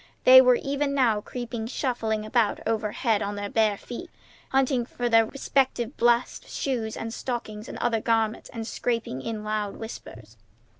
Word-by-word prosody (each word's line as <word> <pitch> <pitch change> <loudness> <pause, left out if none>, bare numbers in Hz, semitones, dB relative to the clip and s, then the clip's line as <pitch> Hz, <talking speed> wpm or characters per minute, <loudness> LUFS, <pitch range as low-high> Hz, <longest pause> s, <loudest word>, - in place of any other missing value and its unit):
They 260 0 +10
were 250 -1 +5
even 280 +2 -1
now 230 -6 +3
creeping 235 -1 -5
shufflingly 225 -4 -2
about 220 -1 +1
overhead 220 0 0
on 205 0 -2
their 205 0 -5
bare 215 -2 +2
feet, 250 - -8 0.4
hunting 265 -2 +2
for 245 0 -3
their 225 -1 +5
respective 265 -2 0
best 240 +1 +1
shoes 235 -5 -2
and 225 0 -5
stockings 225 -4 -5
and - - -7
other 225 -2 0
garments, 225 -1 0
and 230 -3 -6
scrapping 230 - -2
in 215 +6 -4
loud 210 -1 -2
whispers. 225 0 -10
230 Hz, 155 wpm, -26 LUFS, 215-250 Hz, 0.4 s, They